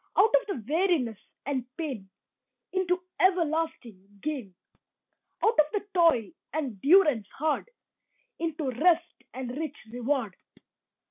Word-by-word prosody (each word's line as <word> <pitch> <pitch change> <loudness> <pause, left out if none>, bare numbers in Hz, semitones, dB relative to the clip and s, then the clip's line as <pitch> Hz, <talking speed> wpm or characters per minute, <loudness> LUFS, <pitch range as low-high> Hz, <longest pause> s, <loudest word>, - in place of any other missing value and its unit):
Out 440 +3 +5
of - - +4
the 265 - -4
weariness 305 - +1 0.3
and 270 -2 -1
pain 260 - -4 0.6
Into 360 -1 0 0.2
everlasting 315 - 0
gain. 260 -12 -4 0.9
Out 440 -6 +3
of 305 - +7
the 415 -1 -1
toil 330 - +4 0.2
and 265 -10 -3
durance 295 - +5
hard 310 - 0 0.7
Into 315 -4 -2
rest 335 +6 +2
and 255 -1 -5
rich 305 -1 -4
reward. 245 -4 -1
305 Hz, 115 wpm, -28 LUFS, 245-345 Hz, 0.9 s, of